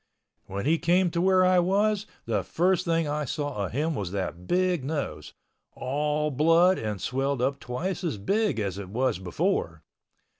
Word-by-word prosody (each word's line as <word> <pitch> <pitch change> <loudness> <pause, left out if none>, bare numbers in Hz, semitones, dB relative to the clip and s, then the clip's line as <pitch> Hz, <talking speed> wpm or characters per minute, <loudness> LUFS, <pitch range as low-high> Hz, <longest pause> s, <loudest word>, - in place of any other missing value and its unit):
When 100 +4 -4
he 160 +3 +3
came 180 0 +2
to 170 - 0
where 185 0 +4
I 185 0 +5
was, 205 +3 +1 0.2
the - - 0
first 180 +1 +1
thing 165 -1 +1
I 150 +1 -1
saw 145 -8 -3
of - - -10
him 155 +5 0
was 100 - -4
that 90 -2 -4
big 180 -4 +1
nose—all 150 - -3
blood 165 +6 +4
and 105 -3 -3
swelled 135 +5 -1
up 135 +2 0
twice 165 +11 -4
as 160 -11 -2
big 200 - 0
as 100 -2 -2
it 95 -2 -7
was 120 -1 0
before. 85 -3 -1
150 Hz, 165 wpm, -27 LUFS, 110-175 Hz, 0.2 s, I